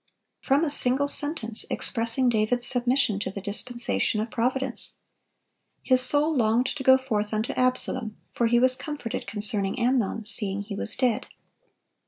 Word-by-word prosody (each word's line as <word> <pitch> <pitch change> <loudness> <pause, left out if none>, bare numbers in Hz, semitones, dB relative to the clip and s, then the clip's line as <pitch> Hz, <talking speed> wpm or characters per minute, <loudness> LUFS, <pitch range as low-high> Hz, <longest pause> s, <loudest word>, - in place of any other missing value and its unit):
From 280 +3 0
a 310 - -1
single 275 0 +4
sentence 280 -7 +2
expressing 235 +2 +1
David's 240 +1 0
submission 245 -4 0
to - - -4
the 200 - -8
dispensation 215 +2 -3
of 220 +1 -5
Providence. 255 +1 -3 0.9
His 255 -1 +4
soul 300 +4 +6
"longed 235 0 +1
to 265 - -5
go 260 0 +5
forth 215 -5 -4
unto 215 +2 -3
Absalom: 255 -3 0
for 235 - -1
he 240 +1 +2
was 255 +1 +3
comforted 285 -8 -7
concerning 205 -1 -1
Amnon, 235 -3 -1
seeing 205 -2 -1
he 205 0 -8
was - - -3
dead." 245 -4 -1
240 Hz, 150 wpm, -24 LUFS, 215-260 Hz, 0.9 s, soul